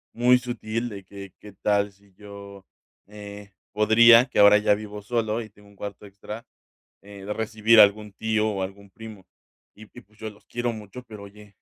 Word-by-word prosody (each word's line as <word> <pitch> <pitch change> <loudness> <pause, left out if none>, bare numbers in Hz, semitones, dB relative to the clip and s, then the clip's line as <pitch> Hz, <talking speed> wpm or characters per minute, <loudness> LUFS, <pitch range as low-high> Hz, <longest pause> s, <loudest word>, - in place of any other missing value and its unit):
muy 125 +1 +4
sutil 120 -1 -4
de 100 -2 -9
que, 100 -1 -12
qué 105 -1 -13
tal 100 -1 +1
si 100 0 -27
yo, 100 -1 -12 0.4
eh, 105 -1 -11 0.2
podría, 115 +3 +6
que 125 - -8
ahora 100 0 +8
ya 105 -1 +2
vivo 105 0 -8
solo 115 +1 -2
y 110 - -10
tengo 105 0 -21
un 100 - -21
cuarto 100 +1 -8
extra, 105 +4 -10 0.6
eh, 100 -1 -12
de 105 - -3
recibir 110 0 +2
algún 105 0 +4
tío 110 0 -1
o 95 -2 -3
algún 100 +1 -9
primo, 110 -2 -12 0.5
y 110 - -14
y - - -12
pues 105 +3 -29
yo 110 - -6
los 105 - -22
quiero 120 0 -3
mucho, 110 +3 -10
pero 110 -4 -12
oye, 100 0 -15
105 Hz, 190 wpm, -24 LUFS, 100-110 Hz, 0.6 s, ahora